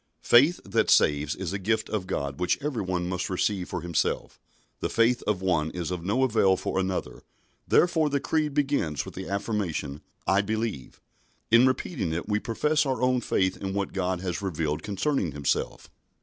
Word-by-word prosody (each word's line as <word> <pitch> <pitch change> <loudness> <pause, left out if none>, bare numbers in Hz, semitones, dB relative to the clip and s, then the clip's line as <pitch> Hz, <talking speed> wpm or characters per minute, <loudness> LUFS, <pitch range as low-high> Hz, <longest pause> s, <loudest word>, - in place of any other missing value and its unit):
Faith 145 +9 +5
that - - +1
saves 75 +1 +3
is 95 -1 -4
a 100 - -2
gift 110 +4 0
of 100 -4 -3
God 70 -5 -3
which 90 - +1
every 135 -5 -2
one 90 -2 -2
must 90 0 -2
receive 95 0 -1
for 90 - -3
himself. 85 -2 -2 0.4
The - - -2
faith 115 +2 +2
of 100 -3 0
one 80 -4 +1
is 85 0 -4
of 90 -2 -4
no 105 +8 +1
avail 105 -6 +3
for 95 - -2
another, 95 -1 -3 0.5
therefore 165 -3 +3
the 140 0 0
Creed 150 0 -1
begins 140 - 0
with - - -9
the 95 - -7
affirmation 95 -8 -2 0.2
"I 95 +1 +3
believe." 110 - -3 0.5
In 120 +3 +7
repeating 130 - -1
it 85 - -3
we 105 0 +1
profess 150 +8 +1
our 130 -4 -1
own 125 0 +2
faith 95 -4 +1
in 95 0 -4
what 100 -1 -2
God 90 -1 -1
has 90 -1 -3
revealed 80 -5 -2
concerning 100 - -1
Himself. 70 -1 -2
95 Hz, 180 wpm, -27 LUFS, 90-120 Hz, 0.5 s, In